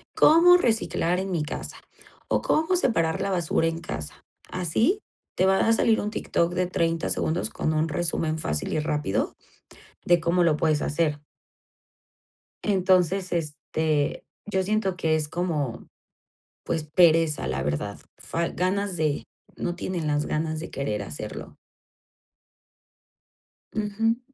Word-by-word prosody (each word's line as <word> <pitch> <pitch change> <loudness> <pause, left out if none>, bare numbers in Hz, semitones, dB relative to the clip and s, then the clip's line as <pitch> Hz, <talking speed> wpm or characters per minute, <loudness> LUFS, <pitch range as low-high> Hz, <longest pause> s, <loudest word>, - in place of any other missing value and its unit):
cómo 340 +3 +7
reciclar 220 - +1
en 190 0 -3
mi 170 -3 0
casa 150 - -6 0.5
o - - +1
cómo 320 +4 +2
separar 190 - +1
la 195 - -1
basura 170 -3 +1
en 165 0 -2
casa, 75 - -7 0.3
así, 220 - +1 0.3
te 185 - +2
va 190 0 +4
a 225 - +5
salir 225 0 +3
un 210 +1 -3
TikTok 170 -5 0
de 180 0 0
30 165 -2 0
segundos 165 +3 -1
con 155 - -1
un 155 +1 +1
resumen 160 -1 -1
fácil 75 - -2
y - - +1
rápido 150 -8 -1 0.7
de 175 0 +5
cómo 170 +2 +2
lo 160 -3 +3
puedes 155 -1 +1
hacer. 150 -1 0 1.4
Entonces, 185 -1 +2
este, 155 -2 -1 0.2
yo 190 -2 0
siento 195 -1 0
que 160 -3 +1
es 155 -1 0
como, 150 -8 -3 0.8
pues 165 -2 -2
pereza, 160 - +3
la 65 +1 -2
verdad. 75 +9 -3 0.2
Fal 170 0 -3
Ganas 190 +1 0
de 155 -2 0 0.3
No 175 - -3
tienen 175 -3 -3
las 150 0 +1
ganas 155 0 -2
de 165 - -7
querer 105 -7 -2
hacerlo. 75 -7 -7 2.2
Ujú. 220 +2 0
170 Hz, 135 wpm, -25 LUFS, 155-190 Hz, 2.2 s, cómo